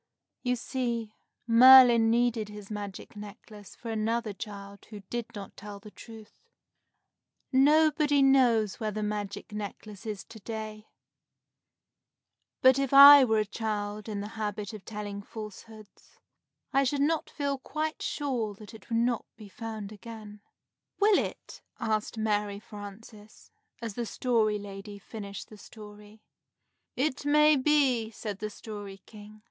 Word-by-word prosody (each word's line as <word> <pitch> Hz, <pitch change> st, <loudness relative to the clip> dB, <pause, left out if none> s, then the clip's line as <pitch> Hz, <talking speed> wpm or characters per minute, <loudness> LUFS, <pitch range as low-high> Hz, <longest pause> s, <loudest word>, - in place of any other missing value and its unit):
You 250 Hz, -1 st, 0 dB
see, 235 Hz, -3 st, -3 dB, 0.3 s
Merlin 240 Hz, -1 st, +8 dB
needed 230 Hz, -2 st, +1 dB
his 210 Hz, 0 st, -10 dB
magic 205 Hz, -1 st, -7 dB
necklace 210 Hz, -1 st, -11 dB
for 230 Hz, -, -7 dB
another 225 Hz, 0 st, -1 dB
child 200 Hz, -1 st, -9 dB
who 210 Hz, -2 st, -10 dB
did 240 Hz, -2 st, -3 dB
not 200 Hz, -1 st, -9 dB
tell 205 Hz, -1 st, -9 dB
the 210 Hz, +1 st, -13 dB
truth. 220 Hz, -1 st, -13 dB, 1.2 s
Nobody 295 Hz, +1 st, +4 dB
knows 240 Hz, -7 st, +3 dB
where 215 Hz, -, -2 dB
the 215 Hz, 0 st, -4 dB
magic 205 Hz, 0 st, -4 dB
necklace 210 Hz, +1 st, -7 dB
is 210 Hz, -3 st, -5 dB
to 225 Hz, -, -13 dB
day; 215 Hz, 0 st, -7 dB, 1.8 s
but 260 Hz, +1 st, +6 dB
if 275 Hz, 0 st, 0 dB
I 280 Hz, 0 st, +11 dB
were 220 Hz, -3 st, +2 dB
a -, -, -2 dB
child 210 Hz, 0 st, -4 dB
in 205 Hz, -2 st, -3 dB
the 205 Hz, -, -6 dB
habit 210 Hz, 0 st, -4 dB
of 205 Hz, -4 st, -10 dB
telling 205 Hz, -2 st, -6 dB
falsehoods, 215 Hz, 0 st, -12 dB, 0.6 s
I 275 Hz, -, +4 dB
should 275 Hz, +2 st, 0 dB
not 315 Hz, +2 st, 0 dB
feel 280 Hz, -2 st, -3 dB
quite 310 Hz, +3 st, -4 dB
sure 245 Hz, -8 st, -2 dB
that 210 Hz, +3 st, -13 dB
it 220 Hz, -, -14 dB
would 230 Hz, -, 0 dB
not 235 Hz, 0 st, 0 dB
be 210 Hz, -2 st, -12 dB
found 220 Hz, -1 st, -7 dB
again. 215 Hz, -1 st, -11 dB, 0.6 s
"Will 410 Hz, 0 st, +5 dB
it?" -, -, -9 dB, 0.2 s
asked 215 Hz, 0 st, -2 dB
Mary 210 Hz, -2 st, -1 dB
Frances, 210 Hz, +1 st, -12 dB, 0.3 s
as 225 Hz, -3 st, -4 dB
the 235 Hz, +2 st, -4 dB
Story 220 Hz, -4 st, +1 dB
Lady 200 Hz, 0 st, -9 dB
finished 200 Hz, -1 st, -9 dB
the 215 Hz, -, -13 dB
story. 210 Hz, 0 st, -14 dB, 0.7 s
"It 280 Hz, +1 st, -1 dB
may 300 Hz, +1 st, +5 dB
be," 265 Hz, -5 st, +2 dB
said 210 Hz, -2 st, -6 dB
the 215 Hz, -, -4 dB
Story 205 Hz, -2 st, -9 dB
King. 210 Hz, 0 st, -13 dB
220 Hz, 140 wpm, -28 LUFS, 210-245 Hz, 1.8 s, I